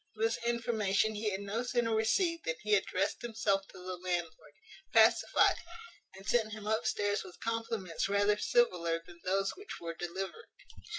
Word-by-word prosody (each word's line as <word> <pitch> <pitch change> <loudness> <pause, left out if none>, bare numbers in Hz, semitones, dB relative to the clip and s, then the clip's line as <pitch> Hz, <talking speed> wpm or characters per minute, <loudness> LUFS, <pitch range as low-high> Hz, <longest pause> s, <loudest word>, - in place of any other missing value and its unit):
This 225 +1 0
information 220 -3 +1
he 210 0 -1
had 195 0 -3
no 200 +3 -2
sooner 240 -2 0
received 335 - +1
than 160 - 0
he 210 0 +1
addressed 195 -1 +1
himself 215 -4 0
to - - -14
the 185 0 -6
landlord, 175 -4 -3 0.4
pacified 225 0 +5
him, - - -15 0.5
and 190 +1 -12
sent 220 -3 +2
him 215 -1 -7
upstairs 210 -2 0
with 185 -2 -12
compliments 225 -6 -2
rather 205 +1 +3
civiller 175 -8 +2
than 175 0 -14
those 195 +1 +1
which 400 +2 -8
were 165 0 -5
delivered. 190 - -5
205 Hz, 160 wpm, -32 LUFS, 185-225 Hz, 0.5 s, pacified